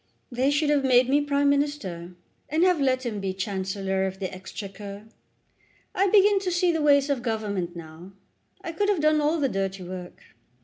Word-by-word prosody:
"They 255 Hz, +3 st, +1 dB
should 290 Hz, +1 st, +1 dB
have 285 Hz, -2 st, +2 dB
made 255 Hz, -1 st, +4 dB
me 285 Hz, +2 st, +3 dB
Prime 285 Hz, 0 st, +1 dB
Minister, 195 Hz, -13 st, -2 dB, 0.3 s
and 315 Hz, +4 st, +2 dB
have 360 Hz, -5 st, +3 dB
let 260 Hz, -1 st, +1 dB
him 215 Hz, -4 st, -3 dB
be 190 Hz, -1 st, -3 dB
Chancellor 190 Hz, 0 st, -2 dB
of 190 Hz, 0 st, -6 dB
the 190 Hz, -1 st, -5 dB
Exchequer. 200 Hz, +2 st, -8 dB, 0.9 s
I 390 Hz, -, +2 dB
begin 405 Hz, 0 st, +5 dB
to 385 Hz, -1 st, -2 dB
see 350 Hz, 0 st, +2 dB
the 325 Hz, -2 st, -1 dB
ways 285 Hz, -1 st, +4 dB
of 270 Hz, -4 st, -1 dB
Government 205 Hz, -7 st, -3 dB
now. 165 Hz, +3 st, -11 dB, 0.5 s
I 335 Hz, -, -4 dB
could 405 Hz, +5 st, 0 dB
have 400 Hz, -5 st, +2 dB
done 305 Hz, 0 st, +3 dB
all 305 Hz, +3 st, +1 dB
the 280 Hz, -, +2 dB
dirty 195 Hz, -3 st, -3 dB
work. 180 Hz, 0 st, -9 dB
245 Hz, 185 wpm, -25 LUFS, 190-295 Hz, 0.9 s, begin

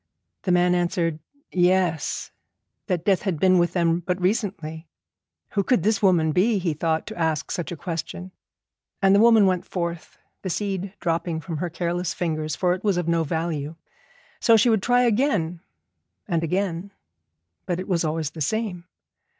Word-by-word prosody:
The 185 Hz, -, -1 dB
man 180 Hz, 0 st, +4 dB
answered 175 Hz, -2 st, 0 dB, 0.3 s
'Yes,' 180 Hz, -3 st, +1 dB, 0.6 s
that 180 Hz, -4 st, -1 dB
death 195 Hz, -3 st, +3 dB
had 185 Hz, -7 st, -2 dB
been 185 Hz, +1 st, +5 dB
with 175 Hz, 0 st, +1 dB
them 170 Hz, -1 st, +2 dB
but 180 Hz, +1 st, -2 dB
recently. 180 Hz, -5 st, -2 dB, 0.6 s
Who 200 Hz, -, +1 dB
could 215 Hz, -4 st, +2 dB
this 215 Hz, 0 st, +2 dB
woman 175 Hz, -6 st, +3 dB
be, 205 Hz, +7 st, +3 dB
he 175 Hz, -4 st, -1 dB
thought, 160 Hz, +1 st, -1 dB
to 220 Hz, -, -7 dB
ask 160 Hz, -3 st, 0 dB
such 175 Hz, -4 st, -3 dB
a 175 Hz, -, -5 dB
question? 170 Hz, +3 st, -5 dB, 0.7 s
And 195 Hz, -1 st, +4 dB
the 200 Hz, -, +5 dB
woman 225 Hz, -2 st, +6 dB
went 185 Hz, -2 st, +1 dB
forth, 170 Hz, -2 st, -5 dB, 0.2 s
the 190 Hz, -, -4 dB
seed 195 Hz, +1 st, -3 dB
dropping 165 Hz, -1 st, -1 dB
from 160 Hz, 0 st, -5 dB
her 175 Hz, +3 st, -2 dB
careless 170 Hz, +1 st, -2 dB
fingers, 155 Hz, -3 st, -2 dB
for 180 Hz, -1 st, +2 dB
it 185 Hz, -, -6 dB
was 200 Hz, -4 st, +2 dB
of 175 Hz, -2 st, -1 dB
no 170 Hz, -1 st, +2 dB
value. 160 Hz, -1 st, -3 dB, 0.6 s
So 230 Hz, -1 st, +5 dB
she 230 Hz, +2 st, +4 dB
would 220 Hz, -3 st, +2 dB
try 245 Hz, +3 st, +3 dB
again 210 Hz, -, +1 dB, 0.7 s
and 165 Hz, -1 st, 0 dB
again, 185 Hz, +2 st, -2 dB, 0.8 s
but 175 Hz, 0 st, -1 dB
it 185 Hz, -, -5 dB
was 175 Hz, -3 st, +1 dB
always 155 Hz, -2 st, -1 dB
the 160 Hz, -, -9 dB
same. 205 Hz, -2 st, -2 dB
175 Hz, 170 wpm, -24 LUFS, 165-195 Hz, 0.8 s, woman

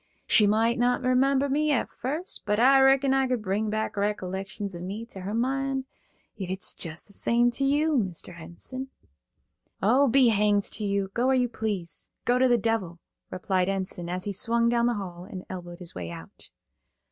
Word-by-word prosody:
She 210 Hz, -, +5 dB
moight 225 Hz, +3 st, +2 dB
not 245 Hz, +1 st, +2 dB
remember 265 Hz, +2 st, +3 dB
me 300 Hz, +3 st, +1 dB
at 265 Hz, -, +1 dB
first, 300 Hz, +9 st, -5 dB
but 210 Hz, +1 st, +1 dB
I 270 Hz, +3 st, +6 dB
reckon 270 Hz, 0 st, +4 dB
I 270 Hz, -1 st, +2 dB
could 250 Hz, -4 st, -1 dB
bring 210 Hz, +2 st, -1 dB
back 215 Hz, +1 st, -2 dB
recollections 200 Hz, 0 st, -3 dB
of 175 Hz, -, -7 dB
me 200 Hz, +5 st, -5 dB
to 200 Hz, -, -11 dB
her 190 Hz, +3 st, -5 dB
mind, 270 Hz, +2 st, -1 dB, 0.6 s
ef 185 Hz, -, -4 dB
it's 190 Hz, +1 st, -2 dB
jes' 165 Hz, -1 st, -3 dB
the 200 Hz, -, -11 dB
same 240 Hz, +3 st, +2 dB
to 275 Hz, -, -1 dB
you, 290 Hz, +1 st, +2 dB
Mr. 180 Hz, -3 st, -4 dB
Enson." 175 Hz, +11 st, -7 dB, 0.9 s
"O, 255 Hz, +8 st, +4 dB
be 255 Hz, 0 st, +5 dB
hanged 205 Hz, -1 st, +3 dB
to 215 Hz, -, -4 dB
you. 200 Hz, -1 st, 0 dB
Go 245 Hz, +2 st, +1 dB
where 265 Hz, -, +4 dB
you 250 Hz, -1 st, +2 dB
please. 205 Hz, -7 st, -4 dB, 0.2 s
Go 245 Hz, +1 st, +3 dB
to 260 Hz, -, +5 dB
the 240 Hz, -1 st, +4 dB
devil," 215 Hz, -6 st, -1 dB, 0.3 s
replied 185 Hz, 0 st, 0 dB
Enson, 185 Hz, -3 st, -3 dB
as 180 Hz, +1 st, -2 dB
he 205 Hz, -, -3 dB
swung 235 Hz, +3 st, +1 dB
down 235 Hz, 0 st, +2 dB
the 240 Hz, -, +1 dB
hall 180 Hz, -3 st, -6 dB
and 185 Hz, -1 st, -8 dB
elbowed 175 Hz, -2 st, -7 dB
his 175 Hz, -2 st, -9 dB
way 85 Hz, -2 st, -6 dB
out. 80 Hz, -1 st, -11 dB
220 Hz, 195 wpm, -27 LUFS, 190-255 Hz, 0.9 s, I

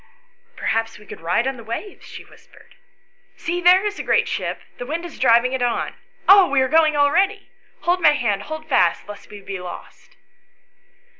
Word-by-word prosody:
"Perhaps 225 Hz, 0 st, -2 dB
we 210 Hz, -, -17 dB
could -, -, -11 dB
ride 175 Hz, +8 st, 0 dB
on 265 Hz, -1 st, -2 dB
the 230 Hz, -, -11 dB
waves," 235 Hz, -, -7 dB
she -, -, -11 dB
whispered. -, -, -21 dB, 0.3 s
" -, -, -39 dB
See, 350 Hz, +1 st, -3 dB
there 365 Hz, +3 st, +5 dB
is 415 Hz, 0 st, -3 dB
a -, -, -4 dB
great 475 Hz, 0 st, +2 dB
ship; 465 Hz, -, -4 dB, 0.2 s
the 245 Hz, -, -5 dB
wind 330 Hz, +4 st, -4 dB
is 345 Hz, -, -10 dB
driving 245 Hz, 0 st, +3 dB
it 260 Hz, -, -2 dB
on. 240 Hz, -1 st, -1 dB, 0.3 s
Oh, 390 Hz, -2 st, +7 dB
we 280 Hz, -1 st, +2 dB
are 260 Hz, -, +2 dB
going 310 Hz, +1 st, +3 dB
already; 385 Hz, +8 st, +1 dB, 0.3 s
hold 355 Hz, +1 st, 0 dB
my 305 Hz, -2 st, +6 dB
hand; 220 Hz, -8 st, -1 dB
hold 315 Hz, 0 st, -7 dB
fast, 180 Hz, -, +1 dB
lest 205 Hz, -1 st, -11 dB
we 205 Hz, -1 st, -11 dB
be 195 Hz, -1 st, -6 dB
lost." 180 Hz, -1 st, -11 dB
285 Hz, 195 wpm, -21 LUFS, 225-350 Hz, 0.3 s, Oh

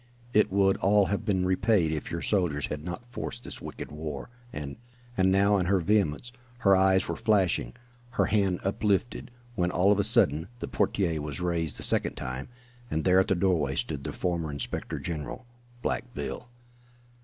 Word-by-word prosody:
It 105 Hz, -, +4 dB
would 95 Hz, 0 st, +3 dB
all 100 Hz, +1 st, +4 dB
have 100 Hz, -, -2 dB
been 95 Hz, -4 st, +1 dB
repaid 95 Hz, -2 st, +2 dB
if 75 Hz, -2 st, -3 dB
your 85 Hz, -, -4 dB
soldiers 85 Hz, -8 st, +1 dB
had 75 Hz, 0 st, -5 dB
not 90 Hz, +7 st, -6 dB
forced 120 Hz, -1 st, -6 dB
this -, -, -8 dB
wicked -, -, -7 dB
war, 75 Hz, -, -6 dB, 0.2 s
and 70 Hz, -2 st, -6 dB, 0.2 s
" 120 Hz, 0 st, -26 dB
and 95 Hz, -1 st, +3 dB
now 100 Hz, +1 st, +4 dB
in 90 Hz, -2 st, 0 dB
her 95 Hz, 0 st, +3 dB
vehemence 100 Hz, +3 st, +1 dB, 0.3 s
her 100 Hz, -4 st, +6 dB
eyes 95 Hz, 0 st, +3 dB
were 85 Hz, -, -2 dB
flashing, 95 Hz, -, +1 dB, 0.4 s
her -, -, +4 dB
hand 100 Hz, -4 st, +1 dB
uplifted, 100 Hz, +3 st, 0 dB, 0.2 s
when, 90 Hz, -5 st, 0 dB
all 95 Hz, +3 st, +3 dB
on 105 Hz, -, +3 dB
a -, -, +3 dB
sudden, 80 Hz, -1 st, +3 dB
the -, -, -5 dB
portière 85 Hz, -6 st, 0 dB
was 75 Hz, +1 st, -5 dB
raised 85 Hz, -3 st, -1 dB
the -, -, -4 dB
second -, -, +4 dB
time, 65 Hz, -, -5 dB, 0.4 s
and 80 Hz, -6 st, -1 dB
there 95 Hz, 0 st, +5 dB
at 95 Hz, -, +2 dB
the 95 Hz, -, +2 dB
doorway 85 Hz, -7 st, +1 dB
stood -, -, -3 dB
the -, -, -4 dB
former 85 Hz, -3 st, -2 dB
inspector 70 Hz, -1 st, -4 dB
general, 75 Hz, -, -5 dB, 0.4 s
"Black 120 Hz, +1 st, -2 dB
Bill." -, -, -5 dB
95 Hz, 185 wpm, -28 LUFS, 80-100 Hz, 0.4 s, her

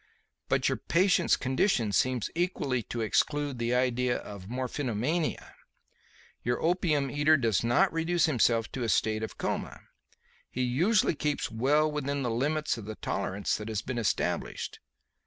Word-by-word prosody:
But -, -, +2 dB
the -, -, +1 dB
patient's 180 Hz, 0 st, +2 dB
condition 130 Hz, -, +1 dB
seems 125 Hz, 0 st, +1 dB
equally 165 Hz, -8 st, -1 dB
to 115 Hz, +2 st, -5 dB
exclude 145 Hz, +4 st, 0 dB
the 120 Hz, +1 st, 0 dB
idea 125 Hz, 0 st, +1 dB
of 100 Hz, -2 st, -9 dB
morphinomania. 130 Hz, +4 st, -2 dB, 0.9 s
Your 120 Hz, 0 st, -1 dB
opium 160 Hz, -5 st, +1 dB
eater 150 Hz, +2 st, +4 dB
does 115 Hz, -7 st, +1 dB
not 140 Hz, +11 st, +3 dB
reduce 165 Hz, 0 st, +2 dB
himself 115 Hz, -6 st, +2 dB
to 130 Hz, -, -5 dB
a 115 Hz, -, -1 dB
state 110 Hz, 0 st, +1 dB
of 110 Hz, -, -6 dB
coma. -, -, -3 dB, 0.7 s
He 130 Hz, -, -2 dB
usually 170 Hz, -, +2 dB
keeps 150 Hz, -1 st, -2 dB
well 145 Hz, +7 st, +2 dB
within 140 Hz, -1 st, -2 dB
the 120 Hz, -, -1 dB
limits 145 Hz, +2 st, 0 dB
of 105 Hz, -, -9 dB
the 110 Hz, 0 st, -6 dB
tolerance 95 Hz, 0 st, -2 dB
that 105 Hz, -, -7 dB
has 110 Hz, -1 st, -3 dB
been 125 Hz, -2 st, -3 dB
established. 110 Hz, -, -2 dB
130 Hz, 150 wpm, -29 LUFS, 115-150 Hz, 0.9 s, eater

